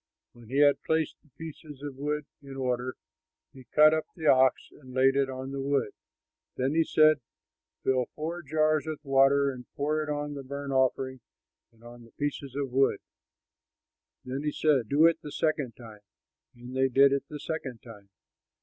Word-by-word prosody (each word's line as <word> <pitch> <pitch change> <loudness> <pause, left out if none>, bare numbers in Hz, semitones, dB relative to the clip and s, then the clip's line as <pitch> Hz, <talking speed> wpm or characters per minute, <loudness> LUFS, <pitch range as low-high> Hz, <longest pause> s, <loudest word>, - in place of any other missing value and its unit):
When 120 -2 -16
he 135 - -2
had 145 -1 +5
placed 160 -1 -1
the 150 - -28
pieces 155 -3 -10
of 145 -2 -6
wood 150 +2 -3 0.2
in 135 -1 -10
order, 125 -1 -2 0.6
he 130 -2 -14
cut 155 +3 +5
up 155 0 -1
the 160 - -7
ox 130 -3 +4
and 130 -3 -14
laid 135 +1 +4
it 140 -1 +2
on 130 +1 -6
the 135 0 -4
wood. 140 -5 0 0.7
Then 130 +3 0
he 165 +1 +4
said, 155 -1 +4 0.6
"Fill 130 -2 +1
four 165 +3 -4
jars 155 0 +1
with 155 -1 -6
water 135 +1 +4
and 125 -2 -10
pour 155 +1 0
it 150 - -4
on 145 0 -3
the 140 - -6
burnt 140 +1 -5
offering 130 0 +1 0.5
and 115 0 -25
on 120 0 -12
the 115 - -19
pieces 140 -2 -4
of 140 -2 -3
wood." 135 +2 +3 1.3
And 130 +3 -4
he 150 - 0
said, 140 -9 +1
"Do 150 +3 +5
it 165 -1 +4
the 150 - -8
second 145 -7 -1
time"; 110 -3 -12 0.6
and 125 +1 -10
they 130 0 +2
did 135 +2 +5
it 140 0 -2
the 150 - -7
second 135 -8 -5
time. 105 -4 -13
140 Hz, 185 wpm, -28 LUFS, 130-150 Hz, 1.3 s, had